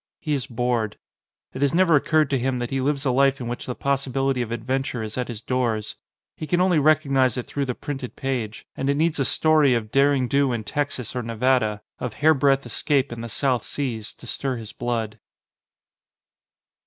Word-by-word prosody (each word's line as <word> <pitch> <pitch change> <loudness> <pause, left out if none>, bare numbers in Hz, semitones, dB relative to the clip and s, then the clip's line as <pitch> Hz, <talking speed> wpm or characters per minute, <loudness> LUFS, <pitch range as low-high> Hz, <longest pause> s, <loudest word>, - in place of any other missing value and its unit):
He 150 - -2
is 135 -3 -2
bored. 120 -3 -1 0.6
It 130 - -6
has 140 +2 +2
never 175 -3 +5
occurred 155 0 +2
to 135 - +2
him 130 +1 0
that 120 -1 -4
he 135 0 0
lives 140 +1 0
a 130 - +3
life 135 +1 +3
in 120 - -5
which 120 +1 -5
the 125 - -3
possibility 135 -1 0
of 115 -2 -4
adventure 125 +1 -2
is 110 0 -5
at 125 -1 -2
his 115 -3 -7
doors. 120 -4 -1 0.4
He 155 - -6
can 175 - +1
only 180 -3 +4
recognise 140 -5 +3
it 125 - -3
through 140 -1 -2
the 125 -2 -3
printed 135 -4 -6
page; 120 -5 -3
and 135 - -2
it 140 - +2
needs 160 0 +1
a 135 - +2
story 155 -4 +4
of 110 -2 -3
derring 135 -2 +3
do 140 +1 +2
in 115 -2 -3
Texas 140 -1 -3
or 125 - -1
Nevada, 115 -2 +1 0.2
of 120 -4 -4
hairbreadth 140 -2 +3
escape 135 +3 0
in 120 -1 -6
the 115 - -6
South 125 0 0
Seas, 115 -7 -4
to - - -14
stir 130 +2 -2
his 110 -2 -9
blood. 115 -3 -3
130 Hz, 200 wpm, -24 LUFS, 120-140 Hz, 0.6 s, never